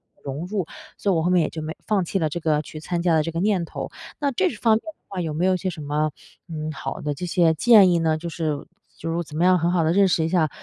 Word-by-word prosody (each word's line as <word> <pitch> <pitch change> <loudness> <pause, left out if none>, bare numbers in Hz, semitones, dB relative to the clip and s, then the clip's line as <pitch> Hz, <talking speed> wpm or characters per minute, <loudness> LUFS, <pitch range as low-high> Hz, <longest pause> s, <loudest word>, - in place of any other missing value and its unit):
地 - - -32
融 140 +4 -4
入， 190 -4 -2 0.3
所 205 - -1
以 - - +2
我 160 - +1
后 175 - +1
面 180 -1 +4
也 - - -1
就 160 - -6
没 155 +1 -4
放 205 -3 +2
弃 190 +3 -1
了 160 - +1
这 155 +3 -4
个 155 -2 +2
去 155 - -9
参 175 +1 -2
加 170 -2 +3
的 155 - +3
这 165 - -3
个 165 - -3
念 195 -2 +2
头。 165 - -6 0.3
那 285 -1 +1
这 370 +9 +2
方 225 -1 +2
面 220 - -1
的 320 - -8
话， 190 -2 -4
有 160 -3 -3
没 165 +4 0
有 190 - +4
一 - - +1
些 185 +1 -2
什 160 -3 -7
么， 150 +1 0 0.4
嗯， 155 -1 -4
好 135 -1 -5
的 150 -1 -2
这 160 +6 -5
些 170 -2 +3
建 205 +2 +6
议 175 -1 +3
呢？ 160 -1 +1
就 170 - -6
是 155 -3 -3 0.3
就 165 - -5
是 - - -2
我 175 - -1
怎 150 0 -9
么 175 - +3
样 185 0 +5
很 170 +2 +1
好 175 -2 +2
地 160 - +2
认 200 0 +5
识 165 -3 +2
一 - - 0
下， 165 -3 +2
170 Hz, 340 characters per minute, -23 LUFS, 155-185 Hz, 0.4 s, 建